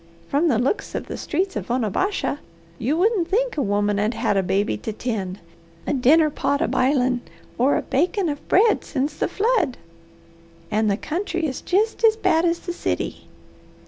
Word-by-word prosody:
From 295 +5 +2
the 255 -8 +3
looks 255 - -1
of - - -3
the - - -6
streets 375 +5 -2
of - - -4
Onabasha, 260 - 0 0.4
you 275 +7 0
wouldn't 385 -2 +2
think - - +1
a 295 - 0
woman 205 -2 +1
'ud 215 +3 0
had - - 0
a 195 - +3
baby 195 +3 0
to 220 - -5
tend, 205 -5 -3 0.5
a - - 0
dinner 300 +4 +4
pot 285 0 0
a - - +1
bilin', 255 -2 +1 0.4
or 265 +4 +3
a - - -2
bakin' 360 - 0
of 290 -2 -5
bread 430 +4 +4
sence 280 +3 -2
the - - 0
flood. 410 - +1 0.9
And 215 0 +2
the 200 - +1
country 345 - -2
is 265 -4 -3
jest 430 +5 0
as 445 -1 +6
bad 355 -5 +2
as 340 0 +1
the 350 - -4
city. - - -3
290 Hz, 180 wpm, -23 LUFS, 235-370 Hz, 0.9 s, as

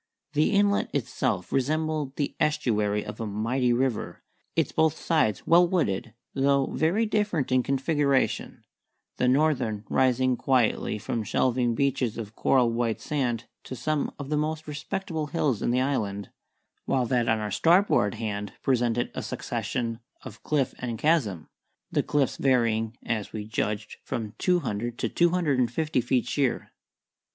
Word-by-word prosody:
The 150 +1 +3
inlet 200 0 +3
itself - - -1
resembled 150 0 0
the 145 - -2
estuary 110 -9 +1
of - - -7
a 115 - -3
mighty 115 +5 0
river, 125 -1 -1 0.3
its - - +1
both 160 -2 +2
sides 110 - +1
well 170 +2 +6
wooded, 115 - -1 0.2
though 140 0 +2
very 180 +9 +2
different 210 -10 0
in 130 0 +4
configuration, 140 +1 0 0.5
the 125 - +2
northern 125 -6 +1
rising 130 -1 +2
quietly 125 -5 +1
from 115 +2 -3
shelving 120 +2 +1
beaches 135 -3 0
of 110 -1 -7
coral 125 -3 +3
white 115 -1 -1
sand 125 -6 -1 0.2
to 130 - -6
some 150 +4 -1
of 140 -1 -7
the 150 - +1
most 155 +1 -2
respectable 155 +1 -4
hills 145 -7 0
in - - 0
the 125 +1 +2
island, 100 -8 -2 0.5
while 130 -2 +1
that 120 -2 +1
on 110 - +3
our 105 -1 -3
starboard 165 - +3
hand 105 -2 -4
presented 120 -2 +1
a - - -4
succession 115 -2 -3 0.2
of - - -10
cliff 145 -4 0
and 120 -2 -3
chasm, 115 - +1 0.4
the - - +2
cliffs 140 -3 0
varying, 115 -3 +1
as 110 -3 -2
we 105 -1 -4
judged, 105 -1 -3
from 110 -2 -4
two 180 -1 +2
hundred 120 -1 -3
to - - -1
two 175 0 +3
hundred 165 -7 +1
and 120 -2 +2
fifty 150 0 0
feet 125 +1 +1
sheer. 135 -4 -1
130 Hz, 155 wpm, -27 LUFS, 115-150 Hz, 0.5 s, well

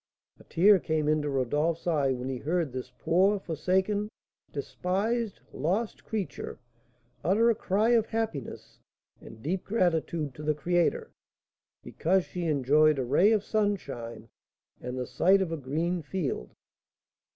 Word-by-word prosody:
A - - -15
tear 195 +3 +5
came 155 -2 -1
into 150 -1 +1
Rodolph's 145 +5 0
eye 145 -6 +2
when 125 0 -3
he 130 -2 -3
heard 160 -2 -1
this 130 -1 -6
poor, 185 +7 +3
forsaken, 190 +5 0 0.4
despised, 200 +9 -2
lost 200 +8 -2
creature 215 -4 -4 0.7
utter 215 +8 +4
a - - +3
cry 210 +1 +1
of 230 -2 +3
happiness 220 - -4 0.4
and 110 0 -13
deep 180 +5 -2
gratitude 165 - 0
to 150 - -10
the 150 0 0
Creator, 175 - 0 0.7
because 185 +2 +1
she 180 -1 -5
enjoyed 150 +1 +4
a 130 - 0
ray 170 - +4
of 215 -3 +2
sunshine 140 - -2 0.5
and 125 +1 -5
the 125 - -2
sight 190 +9 +3
of 190 -4 -1
a - - -1
green 160 +6 -2
field. 145 - -3
170 Hz, 140 wpm, -28 LUFS, 145-195 Hz, 0.7 s, tear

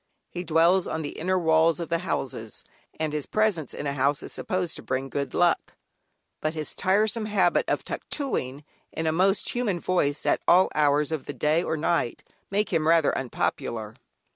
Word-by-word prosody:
He 175 - -4
dwells 170 +2 +3
on 160 - -3
the 145 - -3
inner 185 +3 -1
walls 160 -1 +3
of 170 -1 -5
houses, 135 - -3 0.4
and 155 -1 -1
his 150 -2 -3
presence 210 - 0
in - - -6
a 140 - -1
house 140 +1 +1
is - - -7
supposed 180 -2 -2
to - - -9
bring 130 +1 -3
good 140 0 -3
luck, 175 -2 +2 0.7
but 155 +1 -1
his 155 -1 -3
tiresome 215 +3 +1
habit 190 -4 +2
of - - -1
"tuctooing" 145 - -3 0.3
in 160 - -4
a 160 - +2
most 190 +5 +2
human 220 -8 -1
voice 150 -5 0
at - - +2
all 185 +2 +5
hours 150 0 +2
of 155 -4 -3
the 145 - -4
day 155 +3 +2
or 160 - -2
night 155 -5 0 0.3
make 205 +2 0
him 155 -1 +2
rather 165 -2 +4
unpopular. 115 -3 -2
160 Hz, 180 wpm, -26 LUFS, 145-185 Hz, 0.7 s, all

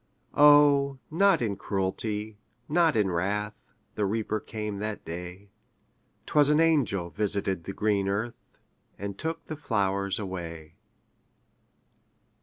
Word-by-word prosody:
O, 145 -2 +6
not 195 -3 +3
in 105 -3 -1
cruelty, 105 +2 -2 0.3
not 165 0 +3
in 105 -4 +2
wrath, 105 +5 -1 0.4
The 105 - -2
Reaper 110 +1 -1
came 105 -1 -5
that 105 0 -4
day; 90 +4 -8 0.7
'Twas 145 -1 +4
an 150 +1 +4
angel 125 - +2
visited 95 -1 -1
the 95 - -5
green 100 -1 0
earth, 110 +4 -4 0.4
And 100 0 -5
took 165 +6 -4
the 155 - -5
flowers 100 -7 -1
away. 85 -5 -6
105 Hz, 115 wpm, -27 LUFS, 95-140 Hz, 0.7 s, O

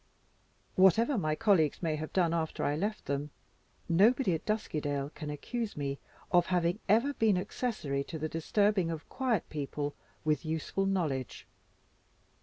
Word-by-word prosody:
Whatever 220 - +5
my 155 -8 0
colleagues 180 -7 +2
may 160 -2 +1
have 155 +1 -5
done, 175 -3 +2
after 160 -2 -1
I 145 - +1
left 210 +7 -2
them, 140 +1 -2 0.6
nobody 205 +4 +4
at 160 - -4
Duskydale 145 -9 -1
can 150 -2 -7
accuse 210 +9 -4
me 140 -1 -3 0.3
of 175 -1 +4
having 180 +1 +1
ever 235 +8 +4
been 220 -7 +3
accessory 180 - -2
to 165 - -6
the 155 +1 -2
disturbing 190 +3 +1
of 160 -1 -5
quiet 250 -8 0
people 145 -1 -3 0.3
with 150 -3 +1
useful 160 +4 -1
knowledge. 155 -10 -2
170 Hz, 145 wpm, -31 LUFS, 150-205 Hz, 0.6 s, Whatever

